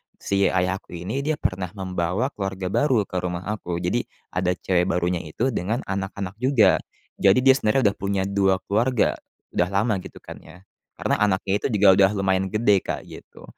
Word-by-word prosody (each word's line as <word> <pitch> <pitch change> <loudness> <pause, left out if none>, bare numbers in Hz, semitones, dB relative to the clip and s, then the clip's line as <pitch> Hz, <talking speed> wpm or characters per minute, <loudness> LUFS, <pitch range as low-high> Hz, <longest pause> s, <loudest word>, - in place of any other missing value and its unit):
si 100 0 +1
ayah 95 +1 0
aku 90 - -12
ini, 100 +11 -4
dia 155 0 +1
pernah 95 -6 -2
membawa 95 +6 -2
keluarga 95 -2 -4
baru 130 -7 +2
ke 95 -2 -4
rumah 90 0 -4
aku. 90 -5 -4
Jadi 115 +8 -1 0.2
ada 90 0 0
cewek 90 0 0
barunya 90 -1 0
itu 110 +12 -2
dengan 110 +3 -2
anak-anak 100 +1 -5
juga. 130 -2 +4 0.4
Jadi 100 +5 +4
dia 135 - +8
sebenernya 120 -3 +2
udah - - -13
punya 100 -1 -1
2 95 -1 +2
keluarga. 115 +3 +1 0.4
Udah 90 - +2
lama, 100 +1 +1
gitu, - - -11
kan, - - -9
ya. 90 +3 -16 0.3
Karena - - -1
anaknya 100 0 +1
itu - - 0
juga 105 -1 +4
udah 95 0 +6
lumayan 95 -1 +1
gede, 105 -1 +3
Kak, - - -5
gitu. - - -13
95 Hz, 180 wpm, -23 LUFS, 90-105 Hz, 0.4 s, dia